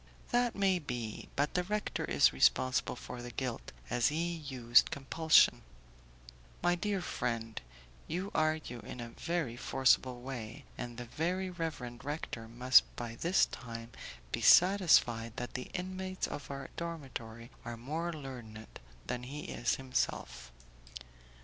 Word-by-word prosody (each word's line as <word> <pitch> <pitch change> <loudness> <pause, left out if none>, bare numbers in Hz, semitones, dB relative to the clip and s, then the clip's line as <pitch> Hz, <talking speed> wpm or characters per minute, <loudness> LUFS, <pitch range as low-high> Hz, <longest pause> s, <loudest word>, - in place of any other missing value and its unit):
"That 245 -1 +2
may 195 -2 +3
be, 120 -7 -5
but 145 +2 +1
the 180 - +1
rector 210 +3 -2
is - - +4
responsible 125 - +3
for 125 0 -8
the 120 - -6
guilt, 125 0 -4 0.2
as 120 -1 +2
he 165 +3 0
used 130 -7 +3
compulsion." 155 +4 +4 1.0
"My 175 0 +4
dear 200 +2 -1
friend, 115 -6 -3 0.5
you 185 +5 -3
argue 155 -6 0
in 125 - -8
a 120 -1 -5
very 165 -7 -2
forcible 130 -1 +2
way, 130 +1 -6
and 120 -1 -6
the 120 - -5
very 180 +8 -2
reverend 150 -9 -5
rector 140 -6 -4
must 125 +3 +6
by 120 -1 -5
this 170 +10 +3
time 115 -1 -8 0.4
be - - -2
satisfied 155 - +5
that 125 - -5
the 125 - -5
inmates 185 0 -3
of 145 - -6
our 135 -1 -6
dormitory 130 -8 -6
are 120 0 -6
more 155 +8 -3
learned 125 -8 -9 0.3
than 125 - -3
he 140 +4 -6
is 120 - -1
himself." 65 - -2
130 Hz, 135 wpm, -33 LUFS, 120-170 Hz, 1.0 s, must